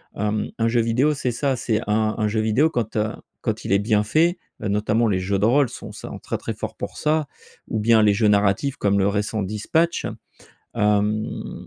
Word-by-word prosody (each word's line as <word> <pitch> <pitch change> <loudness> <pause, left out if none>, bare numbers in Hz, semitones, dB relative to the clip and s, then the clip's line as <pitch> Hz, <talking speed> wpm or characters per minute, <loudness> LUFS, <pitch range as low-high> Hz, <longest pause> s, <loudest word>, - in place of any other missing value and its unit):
Hem, 105 +1 -1
un 115 - +2
jeu 120 +1 +2
vidéo 125 +7 +2
c'est 130 -3 -2
ça, 135 +3 0
c'est 115 -2 -1
un 110 0 +1
un 110 -2 +1
jeu 110 +1 0
vidéo 110 +9 +3
quand, 120 -7 -3
heu, 105 +1 +1 0.3
quand - - -2
il - - -3
est 100 - +4
bien 105 0 +2
fait, 165 - +2 0.2
notamment 105 +3 +1
les 95 -3 +1
jeux 95 +2 -1
de 100 - +2
rôle, 130 +3 +3
sont - - -9
sa - - -8
très, - - -3
très - - -5
forts - - -6
pour - - -6
ça. 155 -1 +1 0.4
Ou 110 - -1
bien, 110 +1 +4
les 105 -1 +5
jeux 105 +2 +2
narratifs 105 +6 +2
comme 100 0 +2
le 95 - +3
récent 105 +1 -1
Dispatch 110 - 0 0.7
hem 105 +1 -1
110 Hz, 205 wpm, -22 LUFS, 105-120 Hz, 0.7 s, les